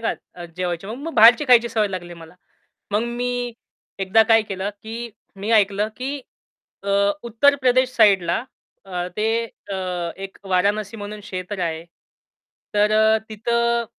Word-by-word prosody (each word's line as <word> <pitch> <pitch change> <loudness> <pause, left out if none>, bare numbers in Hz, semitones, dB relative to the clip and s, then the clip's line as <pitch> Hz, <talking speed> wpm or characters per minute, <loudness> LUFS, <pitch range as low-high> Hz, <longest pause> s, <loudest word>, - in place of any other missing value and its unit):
का, - - +1 0.3
अ, - - -6
जेवायची 180 0 -3
मग 220 +4 -5
मग 330 - -5
बाहेरची 235 +5 +7
खायची 235 -1 +6
सवय 220 -2 +1
लागली 175 -2 -6
मला. 165 +1 -13 0.6
मग 210 +2 +1
मी 245 0 -2 0.5
एकदा 195 +3 +4
काय 225 0 +6
केलं, 195 -1 -4
की 230 +2 -6 0.3
मी 200 +3 -4
ऐकलं 205 0 +3
की 275 +3 -4 0.6
अ, 200 - -6 0.3
उत्तर 240 +5 +3
प्रदेश 255 0 +3
साइडला 195 -6 +4 0.5
अ, 180 -2 -4
ते 225 +2 +1 0.3
अ, 195 - -2 0.4
एक 195 0 -9
वाराणसी 205 +3 +1
म्हणून 210 0 -7
क्षेत्र 185 0 -6
आहे. 165 -1 -3 0.9
तर 210 +1 +3
अ, 220 0 +4
तिथं 235 +2 0
215 Hz, 145 wpm, -22 LUFS, 195-235 Hz, 0.9 s, बाहेरची